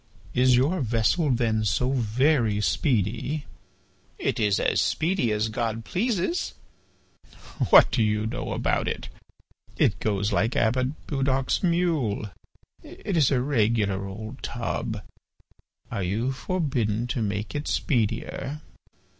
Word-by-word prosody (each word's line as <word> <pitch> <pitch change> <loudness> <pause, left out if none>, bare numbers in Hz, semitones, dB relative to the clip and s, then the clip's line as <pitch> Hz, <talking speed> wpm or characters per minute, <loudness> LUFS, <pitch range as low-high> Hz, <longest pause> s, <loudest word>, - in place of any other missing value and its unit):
"Is 125 0 +4
your 150 +9 +2
vessel 120 +7 +1
then 115 -3 +1
so 125 +5 +1
very 120 -2 +2
speedy?" 120 +6 0 0.7
"It - - -1
is 105 -3 +2
as - - +2
speedy 165 - +1
as 105 +1 +1
God 115 0 -2
pleases." 230 - -1 1.1
"What - - +8
do 120 - +1
you 105 0 +1
know 125 +3 -3
about - - 0
it? - - -4 0.7
It 95 -2 +2
goes 100 0 0
like 110 +5 +1
Abbot 125 +5 0
Budoc's 135 -2 0
mule. 160 - 0 0.5
It 195 - -5
is 155 -6 +4
a 130 -3 +2
regular 110 -7 +1
old 110 +3 -8
tub. - - -3 0.9
Are 100 - -2
you 105 +8 -1
forbidden 130 - -1
to 120 0 -2
make 105 0 -2
it 145 0 -3
speedier?" 125 +4 -1
120 Hz, 120 wpm, -26 LUFS, 110-140 Hz, 1.1 s, What